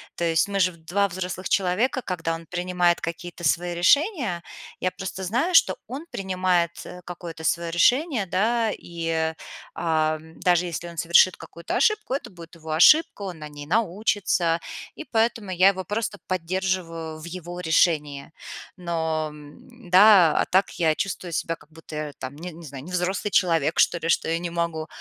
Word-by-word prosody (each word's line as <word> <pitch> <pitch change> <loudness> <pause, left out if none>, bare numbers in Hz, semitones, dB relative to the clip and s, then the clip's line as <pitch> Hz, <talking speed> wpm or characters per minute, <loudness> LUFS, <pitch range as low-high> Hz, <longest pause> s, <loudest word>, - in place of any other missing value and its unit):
То 175 - -4
есть 165 +2 +2
мы 200 -1 -2
же 185 -1 +3
2 175 +5 -1
взрослых 185 0 -5
человека, 210 +9 +1
когда 170 -6 -3
он 165 0 -7
принимает 180 0 +1
какие-то 175 0 -4
свои 175 +2 0
решения, 235 - +2 0.4
я 185 - 0
просто 190 0 -6
знаю, 245 - 0
что - - +5
он 270 +7 -6
принимает, 185 -3 0
э, 180 - -10
какое-то 170 -2 -8
своё 170 +1 0
решение, 245 - +2
да, 220 +5 +1
и, 170 -4 -6
э, 160 0 0 0.4
а, 155 -1 +1
даже 170 +2 0
если 175 0 -5
он 170 - -11
совершит 170 +2 +4
какую-то 170 +1 -6
ошибку, 425 - +1
это 275 - -3
будет 170 -2 -13
его 160 -1 -8
ошибка, 210 - +5
он 185 -5 -6
на 150 - -7
ней 145 0 -9
научится, 190 -3 +1 0.4
и - - -7
поэтому 225 -4 0
я 185 +2 +5
его 190 -1 -2
просто 205 +2 -3
поддерживаю 175 -3 -2
в 155 - -12
его 175 0 -7
решении. 155 -4 +1 0.4
Но 160 -3 -2 0.3
да, 195 -7 +5
а - - +2
так 190 +2 +2
я 160 -2 +3
чувствую 185 -2 -4
себя, 165 +1 -1
как 155 - -22
будто 160 0 -11
я 150 -1 -4
там, 130 +2 -7
не 175 +4 -7
не 165 +1 -12
знаю, 135 -2 -9
не 175 - -10
взрослый 180 +3 -1
человек, 165 -5 +2
что - - +4
ли, 165 - -3
что - - +2
я 165 +1 0
не 175 0 -4
могу 170 -2 -2
175 Hz, 175 wpm, -24 LUFS, 165-190 Hz, 0.4 s, что